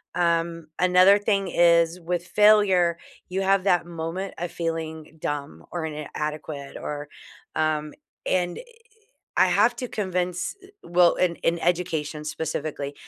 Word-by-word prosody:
Um, 170 Hz, -1 st, 0 dB
another 185 Hz, +2 st, +6 dB
thing 200 Hz, -2 st, 0 dB
is 170 Hz, 0 st, +4 dB
with 175 Hz, 0 st, -3 dB
failure, 190 Hz, -4 st, +4 dB, 0.3 s
you 190 Hz, +1 st, -1 dB
have 195 Hz, 0 st, +3 dB
that 175 Hz, -4 st, +3 dB
moment 170 Hz, +3 st, -5 dB
of 175 Hz, 0 st, -4 dB
feeling 160 Hz, -1 st, -4 dB
dumb 140 Hz, -, -4 dB
or 170 Hz, -2 st, -3 dB
inadequate 150 Hz, -1 st, -5 dB
or, 145 Hz, 0 st, -5 dB, 0.5 s
um 155 Hz, -1 st, 0 dB, 0.3 s
and 180 Hz, -1 st, 0 dB, 0.8 s
I -, -, +6 dB
have 205 Hz, +7 st, +3 dB
to 250 Hz, +1 st, -4 dB
convince 180 Hz, -, -2 dB, 0.3 s
well, 175 Hz, 0 st, +4 dB
in 175 Hz, -2 st, +1 dB
in 170 Hz, +1 st, 0 dB
education 160 Hz, -3 st, -1 dB
specifically, 150 Hz, -2 st, -4 dB
170 Hz, 125 wpm, -25 LUFS, 155-180 Hz, 0.8 s, another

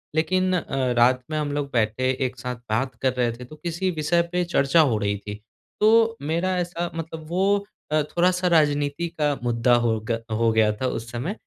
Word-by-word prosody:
लेकिन 185 Hz, +3 st, +1 dB
अ, 135 Hz, -7 st, -1 dB
रात 125 Hz, +2 st, +4 dB
में 155 Hz, -, -1 dB
हम 150 Hz, -1 st, -1 dB
लोग 145 Hz, -1 st, -2 dB
बैठे, 115 Hz, +3 st, +1 dB, 0.2 s
एक 125 Hz, -, -3 dB
साथ 125 Hz, 0 st, -4 dB
बात 130 Hz, +5 st, -1 dB
कर 130 Hz, -1 st, +1 dB
रहे 120 Hz, -2 st, 0 dB
थे, 120 Hz, +2 st, -9 dB
तो 155 Hz, -, -12 dB
किसी 175 Hz, +3 st, -2 dB
विषय 165 Hz, +1 st, +1 dB
पे 180 Hz, 0 st, +1 dB
चर्चा 160 Hz, -1 st, +3 dB
हो 125 Hz, -8 st, +2 dB
रही 100 Hz, -1 st, -1 dB
थी। 105 Hz, +1 st, -7 dB, 0.5 s
तो 225 Hz, +1 st, +4 dB
मेरा 170 Hz, +5 st, -1 dB
ऐसा 175 Hz, -1 st, -2 dB
मतलब 160 Hz, -1 st, -6 dB
वो 200 Hz, +3 st, +1 dB, 0.3 s
अ, 155 Hz, 0 st, +3 dB
थोड़ा-सा 180 Hz, +3 st, +1 dB
राजनीति 150 Hz, -1 st, +2 dB
का 145 Hz, -1 st, +2 dB
मुद्दा 120 Hz, 0 st, +2 dB
हो 110 Hz, -2 st, +1 dB
ग 115 Hz, 0 st, 0 dB
हो 115 Hz, +1 st, +2 dB
गया 110 Hz, -1 st, +3 dB
था 130 Hz, -, +1 dB
उस 115 Hz, -1 st, -4 dB
समय। 130 Hz, -, -3 dB
145 Hz, 200 wpm, -24 LUFS, 120-175 Hz, 0.5 s, रात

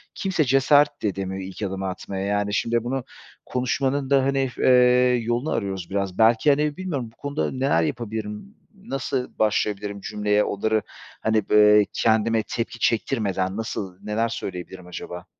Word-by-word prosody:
kimse 185 Hz, -5 st, 0 dB
cesaret 145 Hz, +2 st, +3 dB
de -, -, +2 dB
edemiyor 95 Hz, -1 st, -3 dB
ilk 95 Hz, +3 st, -9 dB
adımı 95 Hz, -1 st, -3 dB
atmaya, 95 Hz, +1 st, -5 dB
yani, 105 Hz, 0 st, 0 dB
şimdi 115 Hz, +2 st, +1 dB
bunu 130 Hz, +1 st, -2 dB, 0.4 s
konuşmanın 130 Hz, +2 st, -1 dB
da, 135 Hz, -1 st, +4 dB
hani, 135 Hz, -1 st, +1 dB
eee, 125 Hz, 0 st, +5 dB
yolunu 120 Hz, +6 st, -1 dB
arıyoruz 95 Hz, -4 st, -3 dB
biraz 100 Hz, -2 st, -2 dB
belki, 115 Hz, +6 st, +4 dB
hani, 150 Hz, +2 st, +2 dB
bilmiyorum 150 Hz, -11 st, -3 dB
bu -, -, -29 dB
konuda 140 Hz, -, -2 dB
neler 130 Hz, -10 st, +1 dB
yapabilirim, 110 Hz, -, -5 dB, 0.3 s
Nasıl 135 Hz, -, -3 dB
başlayabilirim 105 Hz, -1 st, 0 dB
cümleye 105 Hz, 0 st, +1 dB
onları, 110 Hz, +2 st, 0 dB, 0.4 s
hani, 110 Hz, -2 st, 0 dB
b -, -, +3 dB, 0.2 s
eee, 105 Hz, -, +3 dB
kendime 110 Hz, 0 st, +2 dB
tepki 120 Hz, 0 st, -4 dB
çektirmeden 100 Hz, -6 st, 0 dB
nasıl 95 Hz, -4 st, -4 dB
neler 110 Hz, +2 st, 0 dB
söyleyebilirim 90 Hz, -3 st, -6 dB
acaba? 90 Hz, 0 st, -7 dB
110 Hz, 150 wpm, -24 LUFS, 100-130 Hz, 0.4 s, eee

